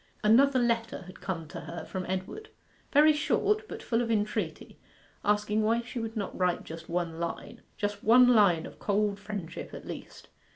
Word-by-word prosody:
Another 260 Hz, +6 st, +5 dB
letter 230 Hz, -3 st, 0 dB
had 185 Hz, +1 st, -13 dB
come 170 Hz, -5 st, -4 dB
to -, -, -7 dB
her 165 Hz, -1 st, -7 dB
from 185 Hz, -1 st, -5 dB
Edward 190 Hz, -, -4 dB, 0.4 s
very 305 Hz, +1 st, +6 dB
short, 425 Hz, +8 st, +1 dB
but -, -, -7 dB
full 230 Hz, 0 st, +1 dB
of 235 Hz, -, -2 dB
entreaty, 210 Hz, -2 st, -2 dB, 0.4 s
asking 210 Hz, +1 st, +1 dB
why 225 Hz, +2 st, +2 dB
she 245 Hz, +1 st, -6 dB
would 225 Hz, 0 st, -4 dB
not 200 Hz, -, -3 dB
write 180 Hz, -1 st, 0 dB
just 165 Hz, 0 st, -9 dB
one 170 Hz, -1 st, -2 dB
line 170 Hz, -, -5 dB, 0.2 s
just 205 Hz, -1 st, -3 dB
one 245 Hz, +3 st, +7 dB
line 200 Hz, -9 st, +5 dB
of -, -, -11 dB
cold 205 Hz, 0 st, 0 dB
friendship 205 Hz, -5 st, -6 dB
at -, -, -9 dB
least? -, -, -9 dB
210 Hz, 175 wpm, -29 LUFS, 185-235 Hz, 0.4 s, one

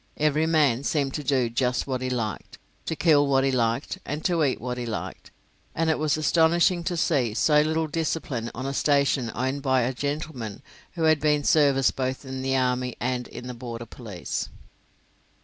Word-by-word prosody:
Every 155 Hz, +1 st, +2 dB
man 145 Hz, -6 st, +3 dB
seemed 140 Hz, -3 st, 0 dB
to 150 Hz, -, -3 dB
do 130 Hz, -3 st, +2 dB
just 125 Hz, +1 st, 0 dB
what 130 Hz, -2 st, -3 dB
he 130 Hz, -, -2 dB
liked, 115 Hz, -5 st, -4 dB, 0.3 s
to 160 Hz, -, -1 dB
kill 150 Hz, -3 st, +4 dB
what 135 Hz, -1 st, +3 dB
he 135 Hz, -, +2 dB
liked, 120 Hz, +7 st, -1 dB
and 150 Hz, +2 st, -5 dB
to 170 Hz, -3 st, +2 dB
eat 135 Hz, -3 st, +1 dB
what 125 Hz, 0 st, -4 dB
he 120 Hz, -, -3 dB
liked, 110 Hz, -, -6 dB, 0.5 s
and 165 Hz, 0 st, +2 dB
it 155 Hz, -, -1 dB
was 155 Hz, 0 st, +1 dB
astonishing 170 Hz, +3 st, +3 dB
to 175 Hz, -, -1 dB
see 130 Hz, -10 st, +1 dB
so 150 Hz, +4 st, +4 dB
little 160 Hz, +1 st, 0 dB
discipline 150 Hz, -6 st, -2 dB
on 130 Hz, +3 st, -5 dB
a 135 Hz, -, -2 dB
station 140 Hz, -4 st, +2 dB
owned 130 Hz, +3 st, -1 dB
by 130 Hz, -2 st, +2 dB
a 125 Hz, +2 st, 0 dB
gentleman 140 Hz, -4 st, -4 dB, 0.3 s
who 165 Hz, -, -3 dB
had 155 Hz, -2 st, +4 dB
seen 150 Hz, -1 st, +2 dB
service 140 Hz, -3 st, +4 dB
both 130 Hz, +1 st, -3 dB
in 130 Hz, 0 st, -5 dB
the 135 Hz, 0 st, 0 dB
army 125 Hz, -1 st, 0 dB
and 125 Hz, -1 st, -2 dB
in 120 Hz, +1 st, -9 dB
the 125 Hz, -, -5 dB
border 120 Hz, -1 st, -7 dB
police. 105 Hz, -6 st, -5 dB
135 Hz, 190 wpm, -25 LUFS, 125-155 Hz, 0.5 s, kill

